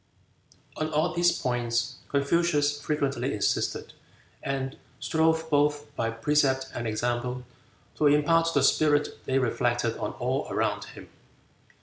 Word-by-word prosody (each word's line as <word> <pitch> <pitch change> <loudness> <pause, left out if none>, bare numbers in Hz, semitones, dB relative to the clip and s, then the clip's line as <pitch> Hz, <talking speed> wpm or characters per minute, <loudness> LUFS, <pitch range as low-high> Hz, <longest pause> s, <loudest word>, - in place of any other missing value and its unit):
On 155 0 -1
all 160 +3 +1
these 175 0 +3
points 120 -6 -1
Confucius 145 0 +1
frequently 140 -4 -1
insisted, 105 - -1 0.5
and 135 -1 -3 0.2
strove 160 0 +1
both 145 0 +1
by 115 - -1
precept 130 +2 +1
and 120 -1 -3
example 120 +3 -2 0.5
to 150 - +4
impart 165 +3 +3
the 140 - +3
spirit 145 +1 +3 0.2
they 130 - +1
reflected 130 -4 0
on - - -3
all - - -2
around - - -1
him. - - -12
145 Hz, 120 wpm, -27 LUFS, 125-155 Hz, 0.5 s, to